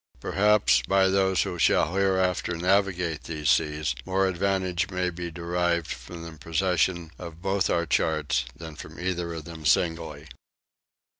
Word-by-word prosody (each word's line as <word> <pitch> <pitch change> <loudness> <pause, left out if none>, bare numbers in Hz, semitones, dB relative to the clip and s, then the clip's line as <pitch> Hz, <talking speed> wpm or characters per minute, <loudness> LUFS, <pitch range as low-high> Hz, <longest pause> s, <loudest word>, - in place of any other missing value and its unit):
Perhaps, 105 - +3
by 95 0 +4
those 95 -1 +2
who 90 - -5
shall 85 - +3
hereafter 95 -2 +1
navigate 90 -3 +1
these 75 -3 0
seas, 75 -4 +1
more 95 +1 +1
advantage 95 -1 0
may 90 -1 -1
be 85 0 -5
derived 85 0 -1
from 85 +8 -8
the 85 - -8
possession 85 0 0
of 85 -2 -8
both 95 0 0
our 85 0 +1
charts 75 -6 +1
than 80 -2 -9
from 75 +2 -10
either 90 -1 -2
of 80 -2 -7
them 80 -2 -9
singly. 80 -2 0
85 Hz, 145 wpm, -26 LUFS, 80-95 Hz, -, by